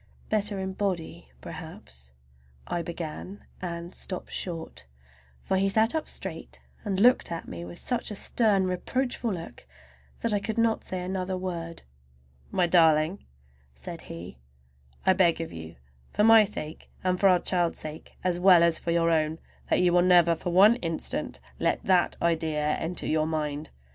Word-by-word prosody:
"Better 210 -1 +1
in 190 0 -3
body 185 - -3
perhaps"—I 65 - -9
began, 170 +3 -7 0.2
and 170 0 -5
stopped 185 - -6
short, 165 - -5 0.6
for 190 - 0
he 195 +1 +2
sat 220 +3 +3
up 315 -1 -2
straight - - -7 0.2
and 195 -3 -1
looked 245 -1 +4
at 165 - -5
me 85 0 -7
with 85 0 -9
such 245 -1 -2
a 210 - -5
stern, 200 -2 +2
reproachful 240 +6 -1
look 165 - -7 0.5
that 230 - 0
I 205 - +2
could 220 +2 -4
not 230 -1 +2
say 185 -1 -4
another 185 0 -2
word. 170 -3 -5 0.7
"My 180 - +2
darling," 165 +1 +3 0.5
said 65 - -8
he, 85 -6 -8 0.7
"I 190 - +6
beg 180 -4 +3
of 165 - -5
you, 80 0 -9 0.4
for 210 - +1
my 225 -1 +8
sake 160 -6 -7
and 185 -1 +1
for 195 - +6
our 180 - +6
child's 175 -1 +1
sake, 155 0 -9
as 180 -1 0
well 180 -2 +7
as 170 -1 +3
for - - -5
your 170 0 +3
own, 155 0 +1 0.3
that - - +3
you 175 -1 +3
will 175 - +5
never 175 -2 +5
for 170 +2 -4
one 200 +7 +6
instant 165 -7 -4 0.2
let - - 0
that 185 -2 +3
idea 160 -3 +1
enter 165 +3 -2
your 155 0 +1
mind! 150 -1 -3
175 Hz, 165 wpm, -27 LUFS, 160-190 Hz, 0.7 s, my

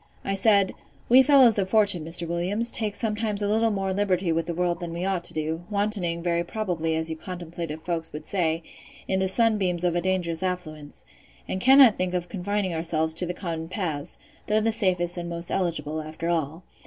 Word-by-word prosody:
I 195 - -1
said, 200 -1 +3 0.4
We 255 +2 +8
fellows 260 -6 +5
of 190 -1 -1
fortune, 205 -6 +3
Mr. 170 +1 -5
Williams, 185 +8 0
take 210 -3 -1
sometimes 215 -2 -2
a - - +1
little 220 +2 +2
more 195 -2 -1
liberty 185 -3 +1
with 165 0 -1
the 170 - -2
world 175 0 0
than 170 -2 -5
we 175 +2 -3
ought 190 -3 -1
to - - -1
do; 160 +1 -2
wantoning, 200 -5 -1
very 170 -1 +1
probably, 170 -5 -2
as 160 0 -1
you - - -3
contemplative 170 -2 -7
folks 165 -2 -2
would 150 - -8
say, 165 -4 -1 0.4
in 190 - 0
the 190 - +1
sunbeams 190 -4 +1
of 175 -1 +2
a 175 - +1
dangerous 175 -2 -1
affluence; 160 -5 -5 0.4
and 190 - -3
cannot 265 -2 +7
think 185 0 -1
of 175 -1 -3
confining 200 -1 -2
ourselves 160 -1 0
to 180 +2 0
the 175 - -4
common 165 -3 -4
paths, 165 -6 -4 0.3
though 215 +1 +3
the 225 +1 +1
safest 180 -5 +1
and 170 0 -5
most 170 0 -4
eligible, 155 -4 -2
after 155 +2 -5
all. 165 0 -2
180 Hz, 200 wpm, -25 LUFS, 165-200 Hz, 0.4 s, We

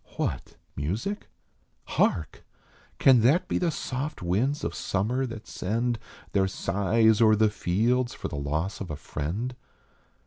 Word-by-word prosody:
What - - -2 0.2
music? 105 - -3 0.6
Hark? 75 -6 0 0.5
Can 130 -4 +6
that 135 +10 +4
be - - 0
the 175 - +2
soft 140 - -4
winds 115 - 0
of - - -2
summer 120 +7 -1
that 115 -2 -8
send 115 +5 -1 0.3
Their 95 -1 +2
sighs 110 +3 +2
o 115 - +7
er 110 - +6
the 110 0 +3
fields 115 +6 +1
for - - -4
the - - -6
loss 75 +8 -2
of 95 - -5
a 75 - -3
friend 90 - -4
110 Hz, 145 wpm, -27 LUFS, 95-125 Hz, 0.6 s, o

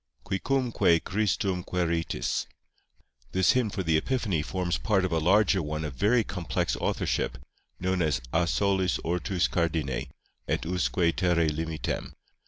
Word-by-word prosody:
QUICUMQUE 110 - +1
CHRISTUM 95 -1 0
QUÆRITIS 85 -2 -1 0.9
This 95 -1 +4
hymn 125 -4 +1
for 95 - -3
the 80 -2 +3
Epiphany 105 - 0
forms 90 +2 -2
part 95 -4 +2
of 90 - -2
a 80 - +2
larger 95 +3 +4
one 75 0 -3
of 75 - -5
very 110 - +3
complex 90 -5 -2
authorship, - - -1 0.4
known 95 0 0
as 75 -7 +1
A 85 +1 +2
solis 95 -2 +1
ortûs 90 +1 0
cardine, 80 -7 -1 0.4
Et - - -1
usque 90 +2 -1 0.2
terræ 85 -3 +2
limitem. 80 +1 -3
90 Hz, 135 wpm, -28 LUFS, 80-100 Hz, 0.9 s, This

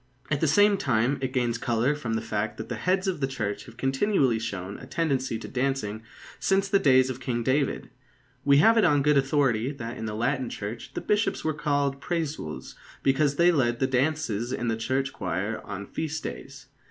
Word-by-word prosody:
At 150 - +1
the 160 - +3
same 205 +6 +5
time, 130 - +1
it 130 -1 -1
gains 120 -3 0
colour 120 +4 +1
from 125 -7 -3
the 110 - -2
fact 105 +2 -2
that - - -7
the - - -2
heads 185 +1 0
of 185 -5 -1
the 135 - 0
Church 110 -6 -4
have 120 -1 -14
continually 135 - +2
shown 100 -3 -5
a 125 - -11
tendency 135 -6 -1
to 110 - -8
dancing 125 -5 -2 0.4
since 195 0 +2
the 195 0 +3
days 130 -3 +4
of 125 - -7
King 120 -2 -2
David. 135 +3 0 0.5
We 140 0 +5
have 225 +9 +6
it - - +4
on 145 -1 +4
good 150 +1 +4
authority 135 -3 +2
that 120 -4 -6
in 110 - -4
the 105 - -4
Latin 125 +2 0
Church 115 +5 -7
the - - -2
Bishops 210 +1 0
were 155 - 0
called 145 -2 0
Præsules 155 - -4 0.3
because 140 +1 +2
they 170 +3 +5
led 120 -7 +1
the 130 - +2
dances 130 -4 0
in 120 -2 -2
the 115 - +1
church 130 +4 -1
choir 100 +6 -3
on 100 -1 -6
feast 160 +5 -4
days. 135 -1 -8
135 Hz, 200 wpm, -26 LUFS, 115-150 Hz, 0.5 s, have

